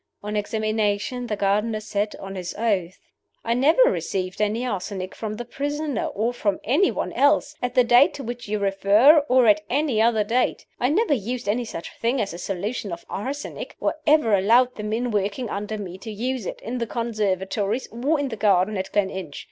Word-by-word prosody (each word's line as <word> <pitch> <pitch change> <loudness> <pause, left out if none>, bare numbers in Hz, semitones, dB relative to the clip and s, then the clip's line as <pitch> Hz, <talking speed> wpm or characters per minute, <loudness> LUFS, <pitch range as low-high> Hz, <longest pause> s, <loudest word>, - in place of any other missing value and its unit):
On 210 +1 -4
examination 215 +3 -1
the 210 - -1
gardener 210 +2 0
said, 210 -1 -2
on 195 0 -8
his 180 -2 -5
oath: 195 -6 -1 0.5
"I 230 - +1
never 290 - +5
received 190 - -1
any 215 +4 0
arsenic 190 -4 -4
from 215 -1 -5
the 240 +2 -6
prisoner, 290 +1 -2
or 225 +4 -1
from 205 -5 -1
any 300 - +3
one - - -3
else, 285 +2 +3
at 250 0 -2
the 250 - +6
date 245 +7 +5
to 275 - -6
which 240 0 -6
you 210 +1 -1
refer, 200 +9 +5
of 260 -3 +3
at 210 -1 +5
any 270 -4 +1
other 225 -2 +3
date. 235 +4 0
I 250 - +2
never 375 +2 +2
used 245 -1 -3
any 235 +4 0
such 170 -6 -7
thing 240 +3 +1
as 200 -5 -2
a 170 - -7
solution 200 +3 -3
of 170 0 -7
arsenic, 275 +8 -5
or - - 0
ever 295 -7 +4
allowed 235 +6 +4
the - - -7
men 225 +3 -2
working 205 +3 -1
under 210 +2 -3
me 190 -3 -7
to 220 - -8
use 235 +1 -3
it, - - -6
in 245 +3 -4
the 235 - -2
conservatories 215 -1 -1
or 275 +7 0
in 285 -1 -1
the 225 - -4
garden 200 -1 +2
at 190 0 -4
Gleninch. 190 -6 -2
220 Hz, 195 wpm, -24 LUFS, 200-250 Hz, 0.5 s, the